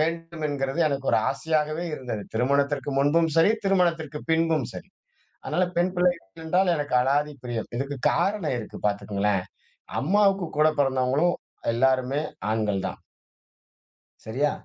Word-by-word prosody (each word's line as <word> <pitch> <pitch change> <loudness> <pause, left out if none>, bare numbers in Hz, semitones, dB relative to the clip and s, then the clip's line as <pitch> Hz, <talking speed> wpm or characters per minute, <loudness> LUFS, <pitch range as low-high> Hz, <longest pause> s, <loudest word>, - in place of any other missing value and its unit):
வேண்டும் 165 0 -2
என்கிறது 140 +2 -2
எனக்கு 140 -1 -2
ஒரு - - +5
ஆசையாகவே 155 +2 -1
இருந்தது. 125 -7 -5
திருமணத்திற்க்கு 140 +3 +1
முன்பும் 160 +4 +3
சரி, 165 +6 +6
திருமணத்திற்கு 165 -6 +1
பின்பும் 160 -5 +2
சரி. - - -8 0.6
அதனால 175 +4 +1
பெண் 180 +1 +2
பிள்ளைகள் 170 -6 0
என்றால் 180 +2 +3
எனக்கு 145 -3 -1
அளாதி 145 +3 +1
பிரியம். 120 -2 -3
இதுக்கு 140 +2 -3 0.2
காரணம் 165 +2 0
இருக்கு 110 - -8
பாத்துக்கங்களேன்! 100 -1 0 0.6
அம்மாவுக்கு 195 +2 +3
கூடப்பிறந்தவங்களும் 145 +1 +2 0.4
எல்லோருமே 130 +3 +2 0.3
ஆண்கள் 105 -3 0
தான். - - -7 1.2
சரியா? 135 +7 0
145 Hz, 120 wpm, -25 LUFS, 130-165 Hz, 1.2 s, சரி